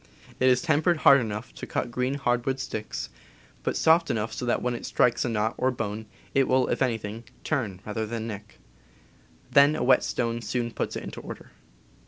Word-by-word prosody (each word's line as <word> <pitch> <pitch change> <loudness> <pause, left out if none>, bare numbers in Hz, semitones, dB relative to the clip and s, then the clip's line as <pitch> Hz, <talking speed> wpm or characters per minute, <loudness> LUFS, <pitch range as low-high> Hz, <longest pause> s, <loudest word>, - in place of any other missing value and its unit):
It 130 - +5
is 125 +2 +3
tempered 165 +2 +2
hard 140 -1 +8
enough 110 0 -5
to - - -8
cut 120 - -2
green 125 +2 -1
hardwood 130 -1 0
sticks, 110 -4 -5 0.5
but - - -1
soft 165 +1 +4
enough 110 0 -1
so 125 - -4
that 120 - +2
when 125 0 -1
it 120 - -6
strikes 125 - +2
a 125 - -1
knot 110 0 0
or 130 - +3
bone 110 -3 -4 0.3
it 135 -1 +3
will, 130 0 +3
if - - -1
anything, 115 -3 -1 0.2
turn 110 - -2
rather 110 +1 -3
than 115 0 -4
nick; 105 -2 -8 0.9
then 140 +2 +6
a - - -1
whetstone 120 -2 +2
soon 120 0 -2
puts - - -3
it - - -4
in - - -7
order. - - -9
120 Hz, 190 wpm, -26 LUFS, 110-130 Hz, 0.9 s, hard